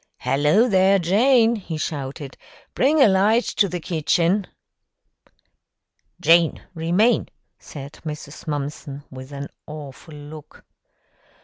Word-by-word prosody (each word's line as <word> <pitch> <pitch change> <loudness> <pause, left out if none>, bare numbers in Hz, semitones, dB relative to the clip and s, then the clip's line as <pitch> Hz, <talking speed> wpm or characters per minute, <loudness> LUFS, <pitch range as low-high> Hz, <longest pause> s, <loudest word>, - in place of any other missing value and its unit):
"Hello, 150 - +2
there, 195 -2 +4
Jane!" 225 +6 +3
he 175 -5 -6
shouted, 140 -2 -5 0.4
"bring 295 +4 +2
a 270 - +7
light 205 +5 +3
to 200 - 0
the 180 +1 -4
kitchen." 170 +3 0 1.7
"Jane, 165 -1 +3
remain!" 180 +8 +1 0.3
said 140 -1 -10
Mrs. 150 -1 -8
Mumpson, 145 -1 -5
with 130 +1 -10
an 140 0 -6 0.2
awful 150 0 -10
look. 150 +1 -12
165 Hz, 105 wpm, -22 LUFS, 145-195 Hz, 1.7 s, a